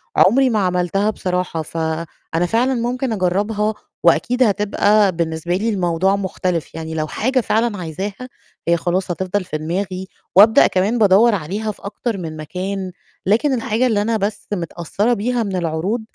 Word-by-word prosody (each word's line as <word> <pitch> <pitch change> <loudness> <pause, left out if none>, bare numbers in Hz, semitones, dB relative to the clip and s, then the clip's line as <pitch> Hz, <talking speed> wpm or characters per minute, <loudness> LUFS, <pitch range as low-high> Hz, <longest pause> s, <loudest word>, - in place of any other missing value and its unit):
عمري 260 +7 +5
ما 220 -3 +1
عملتها 180 +2 +1
بصراحة، 180 -5 -2
فأنا 165 +1 -3
فعلًا 245 +6 +2
ممكن 245 +1 -1
أجرّبها 210 +3 0 0.3
وأكيد 235 +10 +3
هتبقى 210 -1 +3
بالنسبة 170 0 -2
لي 220 +4 0
الموضوع 185 -1 +1
مختلف. 185 -4 -3
يعني 160 0 -5
لو 155 -1 -2
حاجة 255 - 0
فعلًا 225 -1 0
عايزاها، 195 +8 -5 0.4
هي 170 0 +4
خلاص 180 +2 -1
هتفضل 190 +3 -2
في 180 -4 -4
دماغي 185 +4 -3 0.3
وأبدأ 215 +3 +7
كمان 195 +6 +1
بادوّر 210 +2 +5
عليها 200 +6 -3
في - - -16
أكتر 210 +1 -3
من 160 -3 -6
مكان، 185 +4 -4 0.3
لكن 235 +9 +2
الحاجة 245 0 +1
اللي 215 -4 +1
أنا 225 +1 0
بس 205 +1 -3
متأثّرة 180 +5 -1
بيها 240 +2 0
من 195 -3 -3
العروض، 175 +6 -1
195 Hz, 150 wpm, -19 LUFS, 175-220 Hz, 0.4 s, وأبدأ